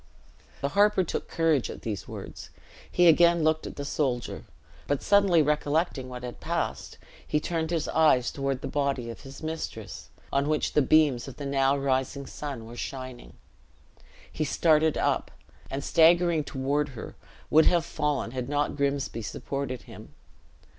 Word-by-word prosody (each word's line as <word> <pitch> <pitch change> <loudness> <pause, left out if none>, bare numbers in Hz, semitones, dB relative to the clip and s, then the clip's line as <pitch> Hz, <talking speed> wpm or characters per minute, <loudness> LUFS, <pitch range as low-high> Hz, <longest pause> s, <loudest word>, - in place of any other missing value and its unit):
The 140 - 0
harper 205 +3 +4
took 170 - -4
courage 160 -6 +1
at - - -8
these 105 -4 -4
words; - - -8 0.4
he 180 - +4
again 170 0 +5
looked 155 0 +1
at - - -8
the 140 - -5
soldier; 130 -5 -2 0.4
but 145 -1 -1
suddenly 195 -5 +4
recollecting 150 -2 0
what 125 0 -8
had 125 -1 -7
passed, - - -3 0.3
he 150 - +1
turned 160 0 -2
his 165 -3 -1
eyes 150 -6 +3
toward 135 -1 -2
the - - -4
body 140 -5 -1
of 115 - -11
his 135 +2 -11
mistress, 135 - -6 0.2
on 140 +2 +1
which 155 -1 0
the 150 - +4
beams 140 -3 +3
of 135 - -9
the 145 - -6
now 140 0 +2
rising 135 0 -1
sun 135 -7 -6
were 115 +1 -10
shining. 130 -2 -7 1.0
He 155 - -2
started 155 +1 +3
up, - - 0 0.4
and 135 +1 -4
staggering 170 -1 +4
toward 140 +3 -1
her, - - -8 0.4
would 160 +1 +6
have 170 -2 +3
fallen, 150 -7 -1
had 125 0 -4
not 145 0 0
Grimsby 140 -4 -1
supported 130 +4 -4
him. - - -13
145 Hz, 160 wpm, -27 LUFS, 130-160 Hz, 1.0 s, would